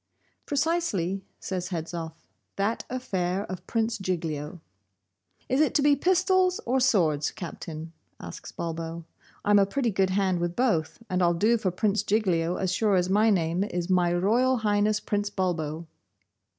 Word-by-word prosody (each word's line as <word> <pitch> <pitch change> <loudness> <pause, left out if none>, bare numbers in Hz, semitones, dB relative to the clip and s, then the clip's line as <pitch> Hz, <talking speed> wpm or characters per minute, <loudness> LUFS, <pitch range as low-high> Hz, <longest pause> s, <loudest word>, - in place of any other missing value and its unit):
'Precisely,' 285 - 0 0.2
says 180 -1 -3
Hedzoff, 165 -2 -5 0.3
'that 205 +4 -1
affair 195 -7 -2
of 185 -1 -8
Prince 225 -1 0
Giglio.' 165 -4 -3 0.9
'Is 260 +3 +2
it 310 - +2
to 290 - +3
be 290 0 +5
pistols, 370 +3 +2
or 255 +3 +2
swords, 170 - +2
Captain?' 165 -2 -7 0.3
asks - - -9
Bulbo. 165 0 -5 0.4
'I'm 205 0 +5
a 195 - +3
pretty 245 +2 0
good 190 -1 +1
hand 190 -2 +1
with 175 0 -2
both, 225 -6 0
and 185 -2 0
I'll 175 -1 +3
do 215 +7 +3
for 210 -5 0
Prince 200 +3 +1
Giglio 180 -5 +1
as 190 -1 -1
sure 210 -1 +2
as 180 0 +1
my 215 +3 +4
name 175 -2 +1
is 180 -3 -3
My 180 -1 +3
Royal 230 +9 +2
Highness 210 +1 +2
Prince 205 -1 -1
Bulbo. 170 -4 -2
190 Hz, 150 wpm, -27 LUFS, 170-225 Hz, 0.9 s, be